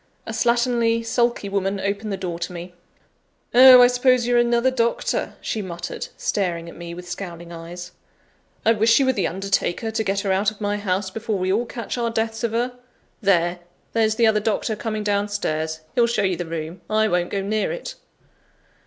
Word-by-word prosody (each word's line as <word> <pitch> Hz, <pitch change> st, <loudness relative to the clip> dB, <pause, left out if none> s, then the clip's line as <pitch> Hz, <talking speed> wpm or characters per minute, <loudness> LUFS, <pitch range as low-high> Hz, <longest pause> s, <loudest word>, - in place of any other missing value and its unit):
A -, -, -5 dB
slatternly, 235 Hz, -1 st, +1 dB
sulky 235 Hz, -2 st, 0 dB
woman 195 Hz, 0 st, -1 dB
opened 200 Hz, +2 st, -2 dB
the 195 Hz, -, -2 dB
door 175 Hz, -3 st, -4 dB
to 175 Hz, +1 st, -4 dB
me. 175 Hz, +1 st, -8 dB, 0.8 s
"Oh! 255 Hz, 0 st, +10 dB
I -, -, +9 dB
suppose 250 Hz, 0 st, +3 dB
you're 240 Hz, 0 st, +3 dB
another 240 Hz, +2 st, +3 dB
doctor," 235 Hz, -2 st, -1 dB
she 220 Hz, -, -2 dB
muttered, 175 Hz, -2 st, -6 dB
staring 175 Hz, -4 st, -1 dB
at 170 Hz, -, -10 dB
me 170 Hz, 0 st, -8 dB
with 180 Hz, 0 st, -9 dB
scowling 175 Hz, -2 st, -7 dB
eyes. 175 Hz, +2 st, -8 dB, 0.7 s
"I 225 Hz, -, +6 dB
wish 225 Hz, +1 st, +4 dB
you 275 Hz, -, +3 dB
were 260 Hz, -, +3 dB
the 195 Hz, -6 st, 0 dB
undertaker, 195 Hz, +3 st, -1 dB
to 220 Hz, 0 st, -1 dB
get 195 Hz, -1 st, 0 dB
her 195 Hz, -, -1 dB
out 195 Hz, +2 st, +2 dB
of 215 Hz, -, -13 dB
my 205 Hz, -1 st, -1 dB
house 190 Hz, -1 st, -2 dB
before 220 Hz, 0 st, -2 dB
we 185 Hz, 0 st, 0 dB
all 235 Hz, +4 st, 0 dB
catch 235 Hz, +1 st, -5 dB
our 235 Hz, -1 st, 0 dB
deaths 225 Hz, 0 st, -2 dB
of 230 Hz, -, 0 dB
her! 245 Hz, +2 st, -1 dB, 0.4 s
There! 175 Hz, -3 st, +2 dB, 0.3 s
there's 220 Hz, -1 st, +2 dB
the 230 Hz, 0 st, +3 dB
other 220 Hz, -1 st, +4 dB
doctor 220 Hz, +1 st, -1 dB
coming 215 Hz, 0 st, -3 dB
down 205 Hz, 0 st, +1 dB
stairs; 160 Hz, -5 st, -2 dB
he'll 235 Hz, -1 st, +3 dB
show 230 Hz, -3 st, 0 dB
you 190 Hz, -2 st, +1 dB
the 175 Hz, 0 st, -5 dB
room 165 Hz, +2 st, -5 dB
I 215 Hz, 0 st, +3 dB
won't 175 Hz, -3 st, 0 dB
go 195 Hz, -1 st, -2 dB
near 215 Hz, +2 st, -1 dB
it." -, -, -5 dB
205 Hz, 195 wpm, -22 LUFS, 180-230 Hz, 0.8 s, Oh